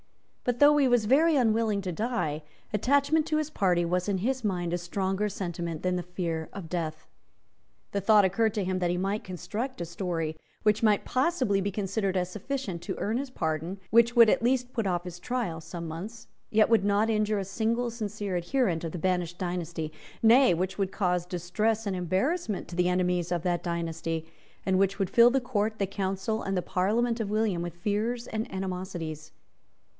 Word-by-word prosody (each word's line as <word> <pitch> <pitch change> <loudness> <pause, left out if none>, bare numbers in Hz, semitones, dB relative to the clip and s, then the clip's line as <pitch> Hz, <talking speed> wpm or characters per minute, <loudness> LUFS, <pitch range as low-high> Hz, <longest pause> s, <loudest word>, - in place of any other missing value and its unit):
But, 245 -1 0
though 290 +3 +7
he 280 -2 +4
was 245 -3 +3
very 305 +8 +4
unwilling 225 -5 +2
to 185 - -2
die, 175 -7 -2 0.3
attachment 285 +8 +2
to 310 - +1
his 310 0 -2
party 180 - +2
was 180 +3 0
in 195 - +1
his 255 +6 -1
mind 175 -4 -1
a - - +2
stronger 190 +3 -1
sentiment 170 -4 -4
than 180 0 +1
the 180 - -1
fear 170 -3 -3
of 195 -4 -7
death. 160 -2 -3 0.9
The 200 - -1
thought 210 0 +6
occurred 220 +4 +1
to 205 - 0
him 185 0 -1
that 175 -1 +1
he 175 - 0
might 195 +3 -1
construct 215 +8 -5
a 170 - -2
story, 170 -2 -3 0.3
which 210 0 +3
might 215 -3 +3
possibly 255 - +1
be 200 - -1
considered 195 -1 -1
as 180 -1 0
sufficient 215 -4 -4
to 190 - -4
earn 220 +3 -1
his 280 0 -4
pardon, 165 - -3
which 235 +2 +5
would 230 -1 +8
at - - +2
least 250 +1 +1
put 225 -4 -1
off 175 -2 0
his 175 -1 -8
trial 185 -6 -2
some 170 +1 -6
months, 200 +8 -7 0.2
yet 215 0 +4
which 225 -3 +4
would 200 - -1
not 205 +2 +2
injure 215 -1 +1
a 195 - -2
single 230 +4 -1
sincere 210 -4 -4
adherent 175 -1 0
of 165 - -4
the - - -3
banished 175 -1 -1
dynasty, 170 -3 -3 0.3
nay, 240 -2 +6
which 185 +3 -2
would 195 -1 0
cause 180 -3 0
distress 210 +6 -1
and 200 -2 -1
embarrassment 200 - -1
to 170 - -8
the 180 0 +2
enemies 180 -1 0
of 175 -2 0
that 175 -1 0
dynasty, 165 -1 -3 0.4
and 190 -1 +2
which 195 0 +2
would 195 -1 -1
fill 235 0 +7
the 270 +2 +2
Court, 220 -4 -1
the 200 - +1
Council, 195 +3 -2
and 195 -1 -2
the 180 - 0
Parliament 220 +7 +1
of 215 -3 -2
William 210 -4 +1
with 175 -1 -5
fears 215 +6 -1
and 220 0 -4
animosities. 180 -5 -5
195 Hz, 200 wpm, -28 LUFS, 175-225 Hz, 0.9 s, would